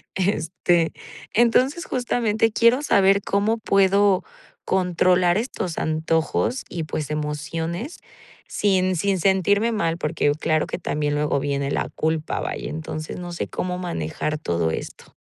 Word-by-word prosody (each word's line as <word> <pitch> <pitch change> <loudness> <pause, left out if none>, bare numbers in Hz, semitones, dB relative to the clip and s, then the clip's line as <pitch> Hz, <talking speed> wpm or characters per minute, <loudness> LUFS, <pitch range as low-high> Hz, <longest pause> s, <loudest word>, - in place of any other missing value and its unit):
Este 175 -2 +1 0.4
Entonces, 255 +8 +3
justamente 225 -3 0
quiero 235 +4 +4
saber 200 -5 +4
cómo 205 +3 +1
puedo 200 -2 +3 0.4
controlar 180 -1 +3
estos 210 -7 -3
antojos 160 +9 0
y, 170 - -4
pues, 150 -1 -4
emociones, 160 - -3 0.5
sin 185 -2 +1
sin 190 +2 0
sentirme 200 +4 +2
mal. 170 -7 0
Porque, 150 -2 +1
uh, - - -2
claro 155 0 +1
que - - -4
también 150 -3 -1
luego 150 -1 +1
viene 140 0 -1
la - - -1
culpa, 160 0 -1
vaya. - - -4
Entonces, 155 0 -5
no 175 -1 -6
sé 170 - -3
cómo 180 0 -3
manejar 155 - -3
todo 85 - 0
esto. - - -7
180 Hz, 135 wpm, -23 LUFS, 155-200 Hz, 0.5 s, quiero